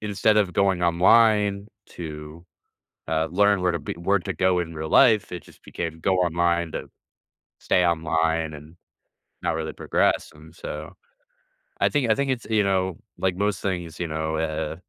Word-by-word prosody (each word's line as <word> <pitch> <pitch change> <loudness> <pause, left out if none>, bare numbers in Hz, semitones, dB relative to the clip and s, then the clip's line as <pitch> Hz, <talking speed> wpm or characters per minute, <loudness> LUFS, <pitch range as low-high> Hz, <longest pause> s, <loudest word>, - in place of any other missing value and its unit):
instead 105 +1 +1
of 100 -4 +2
going 95 -1 +1
online 100 +3 +4 0.2
to, 75 0 -9 0.6
uh, 80 0 +1
learn 100 +1 +3
where 90 -1 +1
to 85 - -2
be - - -5
where 90 +4 +1
to - - -4
go 95 -1 +1
in 85 -1 -5
real 80 0 -5
life, 110 - +4
it 90 - -6
just - - -19
became 80 -1 -5
"Go 95 +2 +1
online 85 -1 +1
to - - -5 0.7
stay 90 - +2
online," 80 -1 0
and 75 +3 -12 0.7
not - - 0
really 80 0 -3
progress, - - 0
and 80 +1 -15
so, 75 -1 -7 0.9
I - - +4
think 130 -6 +1
I - - +4
think 140 +2 -1
it's, 120 -3 -3
you 110 -2 +3
know, 95 -3 0 0.2
like 95 -2 0
most 100 0 -1
things, 90 -4 -4
you 85 - -2
know, 80 0 -3
uh 80 -1 -2
85 Hz, 175 wpm, -24 LUFS, 80-100 Hz, 0.9 s, online